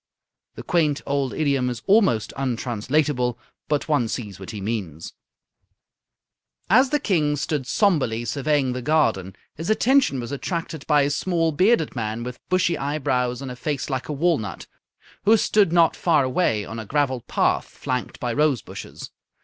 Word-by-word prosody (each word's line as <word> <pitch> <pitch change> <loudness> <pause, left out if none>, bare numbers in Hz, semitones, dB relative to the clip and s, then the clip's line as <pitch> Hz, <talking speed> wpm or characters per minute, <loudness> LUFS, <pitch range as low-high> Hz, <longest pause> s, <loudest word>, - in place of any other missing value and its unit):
The - - -8
quaint 155 -5 +1
old 140 -2 -1
idiom 140 -5 0
is 120 -1 -6
almost 195 - +3
untranslatable, 125 +1 -1 0.3
but 150 -1 -1
one 145 -7 +2
sees 105 -5 -5
what 95 - -9
he 105 - -6
means. 95 -7 -4 1.6
As 255 +5 +6
the 295 - +1
King 160 - +1
stood 145 -2 -2
sombrely 125 - +1
surveying 140 -1 0
the 125 - -4
garden, 115 - +1 0.2
his 165 +5 -6
attention 245 - +3
was 120 +2 -6
attracted 160 +1 -4
by 150 -2 +4
a 140 - 0
small, 165 +1 0
bearded 180 - +2
man 110 0 -3
with 125 0 -7
bushy 185 -2 +1
eyebrows 130 -3 -1
and 130 - -5
a - - -7
face 145 +1 -3
like 130 +2 -3
a - - -1
walnut, 145 - -1 0.6
who 220 +2 +6
stood 205 -4 +3
not 170 -2 +4
far 160 -5 +2
away 130 - 0
on 115 - -7
a 110 - -6
gravelled 130 -3 -1
path - - +1
flanked 125 -1 -4
by 120 -1 -2
rose 145 -3 +1
bushes. - - -9
140 Hz, 160 wpm, -23 LUFS, 120-160 Hz, 1.6 s, As